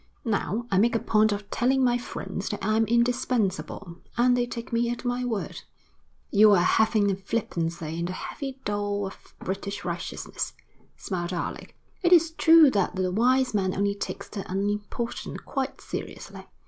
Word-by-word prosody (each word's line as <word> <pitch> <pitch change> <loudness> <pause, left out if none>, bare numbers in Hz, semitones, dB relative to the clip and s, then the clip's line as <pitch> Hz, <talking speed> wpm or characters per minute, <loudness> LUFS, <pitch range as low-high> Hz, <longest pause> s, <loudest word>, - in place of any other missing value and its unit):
Now, 220 +1 -1
I 190 - +4
make 235 +3 +3
a - - +3
point 215 -1 +3
of 205 0 -3
telling 260 +2 +2
my 245 -1 +3
friends 195 -4 -5
that 205 -2 -4
I'm 220 +1 +3
indispensable, 225 -6 0 0.2
and 245 +1 +4
they 245 -1 +1
take 235 -1 -7
me 235 0 +2
at 240 +1 -4
my 245 +1 0
word.' 230 -5 -3 0.7
'You 210 0 +7
are - - +6
a - - +3
leaven 215 -2 +3
of 195 0 -4
flippancy 170 -6 -2
in 170 - -1
the 180 - -3
heavy 270 +7 -6
dough 205 -1 -1
of 195 - -11
British 200 +1 -4
righteousness,' 175 0 -4 0.4
smiled 180 -2 -3
Alec. 175 - -5 0.2
'It 350 -2 +2
is 330 -2 +6
true 325 -3 +7
that 200 -4 0
the 185 -1 0
wise 255 +4 +3
man 190 -3 0
only 200 +1 +1
takes 200 - -5
the 200 -2 -6
unimportant 205 +4 -3
quite 270 0 -3
seriously.' - - -7
210 Hz, 170 wpm, -26 LUFS, 195-245 Hz, 0.7 s, You